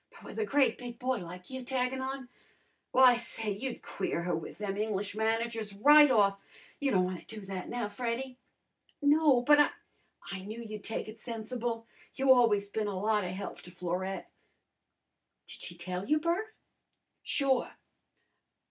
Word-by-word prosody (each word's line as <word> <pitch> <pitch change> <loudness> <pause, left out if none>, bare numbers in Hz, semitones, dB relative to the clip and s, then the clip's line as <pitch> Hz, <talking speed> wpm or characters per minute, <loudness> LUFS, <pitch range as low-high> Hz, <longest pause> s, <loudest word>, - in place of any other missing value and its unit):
But - - -16
with - - -7
a 435 - +1
great 280 -7 +2
big 240 -2 -7
boy 255 -1 0
like 180 +4 -9
you 260 0 -5
taggin' 260 +1 -1
on 265 -1 -4 0.6
W'y, 250 -2 +7
say, 225 -2 -3
you'd 240 +5 -4
queer 180 -3 -2
her 175 -1 0
with 160 - -6
them 205 -2 -3
English 205 -1 -1
managers 225 -1 -1
right 295 +7 +8
off. 200 -5 +4 0.4
You 280 - +1
don' 185 -7 +3
wanna 180 -1 -5
do 220 -1 -8
that 190 -2 -6
now, 240 -3 -2
Freddy?" 250 +3 -4 0.6
"No, 290 -3 +4
but 295 +3 +6
I 295 - +6 0.4
" - - -14
"I 195 - -4
knew 215 +4 -7
you'd 215 -2 -7
take 220 - -3
it 215 +1 -10
sensible. 230 0 -4 0.3
You 265 0 +6
always 215 -5 +3
bin 210 +1 -2
a 200 -2 -3
lot 210 +1 +1
of 180 - -3
help 190 +2 -6
to - - -11
Florette." 180 +2 -4 1.1
"Did - - -10
she 175 - -7
tell 180 +2 -4
you, 305 - +4
Bert?" 345 +7 -1 0.7
"Sure!" 270 -3 +1
225 Hz, 170 wpm, -31 LUFS, 200-260 Hz, 1.1 s, right